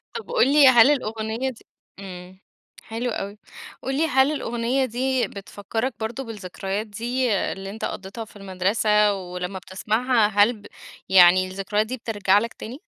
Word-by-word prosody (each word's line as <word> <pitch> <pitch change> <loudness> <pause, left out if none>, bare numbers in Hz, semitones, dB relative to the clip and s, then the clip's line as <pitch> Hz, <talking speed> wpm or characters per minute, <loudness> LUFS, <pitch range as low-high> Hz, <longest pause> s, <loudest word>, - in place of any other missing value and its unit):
طب، 465 0 -7
قل 445 - +3
لي 295 -2 +7
هل 255 +1 +7
الأغنية 225 -1 -2
دي 245 - -12 0.3
امم، 185 -1 -10 0.4
حلو 230 +2 -4
أوي. 200 0 -5 0.4
قل 270 +1 -3
لي 320 - +2
هل 265 0 +3
الأغنية 245 -1 -1
دي 255 +1 0
بتفكرك 205 +5 -4
برضه 230 +4 -4
بالذكريات 200 -1 -5
دي 240 +3 -1
اللي 195 0 -2
أنت 215 +3 -5
قضيتها 195 +4 -6
في - - -20
المدرسة 205 +2 +1
ولمّا 180 0 -5
بتسمعها 215 +6 +1
هل 205 +3 +3
ب - - -17 0.4
يعني 185 0 +6
الذكريات 195 +3 -1
دي 255 +3 -4
بترَجع 205 -4 +2
لك 230 +2 -4
تاني؟ 245 +6 -9
220 Hz, 155 wpm, -23 LUFS, 195-250 Hz, 0.4 s, لي